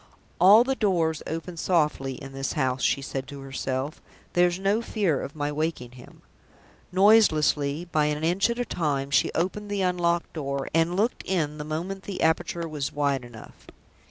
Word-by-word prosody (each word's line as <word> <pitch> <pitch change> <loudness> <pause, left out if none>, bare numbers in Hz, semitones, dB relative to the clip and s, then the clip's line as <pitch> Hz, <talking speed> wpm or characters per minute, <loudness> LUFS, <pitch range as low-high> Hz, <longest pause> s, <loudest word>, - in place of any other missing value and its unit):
"All 200 +6 +8
the 270 +2 0
doors 170 -9 0
open 165 +2 -5
softly 150 -6 +1
in 135 +1 -10
this 135 0 -3
house," 130 -4 0
she 140 - +1
said 135 -1 -5
to 140 +1 -9
herself; 135 +1 -4 0.3
"there's 175 0 +3
no 200 +4 +1
fear 200 - 0
of 140 - -7
my 145 -1 -2
waking 150 -5 -3
him." 125 -1 -15 0.7
Noiselessly, 170 -7 +4
by 150 -1 +2
an 150 +1 -1
inch 180 +6 +2
at 235 - -2
a 245 - -1
time, 140 -7 -2
she 135 - +3
opened 195 +5 -2
the 200 -1 -1
unlocked 175 -2 0
door, 140 -3 -3
and 165 +2 +2
looked 220 +6 0
in 155 -5 -1
the - - -3
moment 170 +6 -4
the 200 - -3
aperture 165 +1 0
was 150 -3 -3
wide 140 -3 0
enough. 120 -2 -13
160 Hz, 175 wpm, -26 LUFS, 140-185 Hz, 0.7 s, All